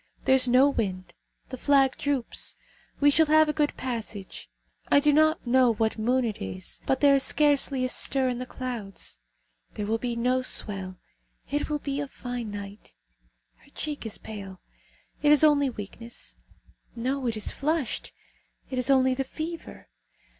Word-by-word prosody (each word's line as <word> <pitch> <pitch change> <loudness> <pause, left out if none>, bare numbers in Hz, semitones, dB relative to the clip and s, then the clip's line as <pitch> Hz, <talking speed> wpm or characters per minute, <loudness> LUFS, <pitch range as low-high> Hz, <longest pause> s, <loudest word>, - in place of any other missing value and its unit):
There - - +4
is 260 -1 +6
no 255 +3 +5
wind: 185 -9 -3 0.4
the 255 - -6
flag 275 -1 +3
droops. 280 -4 -2 0.4
We 290 0 +5
shall 320 +2 +4
have 310 +1 +5
a 300 - 0
good 295 -1 0
passage. 220 - -5 0.4
I 285 - +7
do 295 +1 +3
not 310 0 +3
know 245 -1 +4
what 220 +1 -1
moon 250 +3 +1
it 220 -3 -4
is, 95 -1 -5
but 265 - +1
there 285 -1 +6
is 275 - +4
scarcely 280 -3 +3
a - - -2
stir 265 +1 +2
in 245 -1 -2
the 255 - -5
clouds. 230 - -6 0.6
There 210 - -3
will 225 +2 -1
be 240 -1 -3
no 250 +2 +1
swell. 195 -7 -1 0.5
It 290 +2 -1
will 300 - 0
be 280 -1 -4
a 290 - -3
fine 245 -4 -6
night. 205 0 -9 0.6
Her - - -23
cheek 300 -1 -4
is 225 -2 -3
pale; 195 -3 -9 0.6
it 295 - +4
is 300 0 +6
only 290 -3 +4
weakness! 230 +1 -9 0.6
No, 255 +2 -2
it 225 -2 -1
is 215 - -1
flushed; 300 -2 -2 0.6
it 255 - -1
is 250 - +2
only 260 -1 +4
the 270 +1 -1
fever. 320 +5 -7
255 Hz, 170 wpm, -26 LUFS, 225-285 Hz, 0.6 s, I